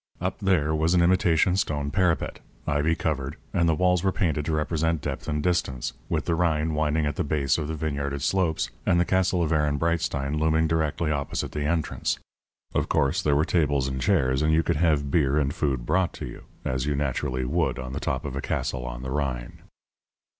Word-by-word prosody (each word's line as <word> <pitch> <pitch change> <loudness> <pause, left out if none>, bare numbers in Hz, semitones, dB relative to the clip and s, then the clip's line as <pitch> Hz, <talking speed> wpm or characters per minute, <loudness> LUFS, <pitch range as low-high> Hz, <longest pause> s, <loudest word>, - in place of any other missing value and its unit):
Up 95 +2 -2
there 90 -7 +2
was 80 +3 +2
an 85 - +5
imitation 90 0 +3
stone 75 -7 -1
parapet, 90 -1 +1 0.3
ivy 75 +2 +1
covered, 70 -4 -2 0.2
and 85 -1 +3
the 80 - +3
walls 90 +1 +2
were 95 - +3
painted 75 -6 0
to 80 - -1
represent 80 +1 0
depth 75 -1 -5
and 75 0 -1
distance, 75 -8 0 0.2
with - - -1
the 85 - +1
Rhine 80 -2 +1
winding 75 0 +1
at 75 -1 -2
the - - +1
base 70 -1 +1
of 75 - -3
the 80 - -3
vineyarded 70 -2 -3
slopes, 80 -8 +1
and 85 - +3
the 85 - +3
castle 95 -1 +2
of 80 - -1
Ehrenbreitstein 75 -1 0
looming 80 +1 +2
directly 80 0 0
opposite 70 -2 -2
the 75 -1 -3
entrance. 80 0 0 0.6
Of - - 0
course 70 - +2
there 75 -1 +2
were 75 +2 +3
tables 70 -6 +1
and 65 -1 -3
chairs; 65 +2 +2
and 75 +1 +3
you 80 +1 +3
could 85 -2 0
have 75 -4 +2
beer 70 -3 +2
and 70 -1 +1
food 65 -7 -1
brought 90 +5 0
you, - - -7 0.2
as 65 +2 -1
you 75 - +1
naturally 65 -2 -1
would 60 - 0
on 65 -1 -6
the 70 - -3
top 70 0 -2
of 70 -2 -4
a 70 - -2
castle 65 -1 -2
on - - -6
the 65 - -4
Rhine. 65 -4 -3
75 Hz, 205 wpm, -26 LUFS, 70-85 Hz, 0.6 s, an